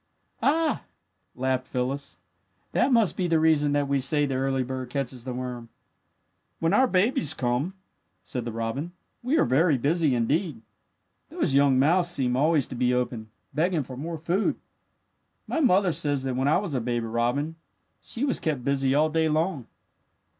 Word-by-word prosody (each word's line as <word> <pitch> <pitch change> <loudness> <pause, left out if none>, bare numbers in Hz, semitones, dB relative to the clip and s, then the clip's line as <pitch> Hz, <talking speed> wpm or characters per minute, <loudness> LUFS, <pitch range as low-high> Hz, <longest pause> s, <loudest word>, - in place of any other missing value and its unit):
"Ah," 320 +2 +1 0.5
laughed 130 0 -1
Phyllis, 130 +3 -3 0.5
"that 275 - +2
must 230 -6 +3
be 180 - -1
the 165 -2 +2
reason 155 -2 +3
that 145 -1 +1
we 140 0 +1
say 145 +3 +2
that 135 - -2
the 130 - -1
early 135 -1 0
bird 130 0 -5
catches 130 -2 -4
the 130 - -4
worm." 125 -2 -6 0.9
"When 165 0 0
our 260 0 +5
babies 185 - +2
come," 130 +9 -1 0.5
said 125 +5 -4
the 120 - -4
robin, 115 +9 -4 0.3
"we 260 +6 +1
are - - +4
very 150 +2 +3
busy, 150 +1 +1
indeed. 145 - -1 0.7
Those - - -1
young 140 -1 +4
mouths 170 +7 +3
seem 130 -8 0
always 150 0 +3
to - - -6
be 125 0 +1
open, 120 -3 -3 0.2
begging 165 0 +1
for 130 0 -9
more 160 +5 -5
food. 175 +6 0 0.9
"My 325 - -2
mother 195 - +4
says 145 -3 -1
that 130 -2 -2
when 130 +2 0
I 150 - +4
was 185 -5 -3
a 130 - 0
baby 120 0 -2
robin 120 +8 -1 0.4
she 245 +5 -3
was 270 - 0
kept 145 -6 -2
busy 135 -1 +1
all 155 +2 +3
day 160 0 +2
long. 155 -4 -1
140 Hz, 175 wpm, -26 LUFS, 125-165 Hz, 0.9 s, our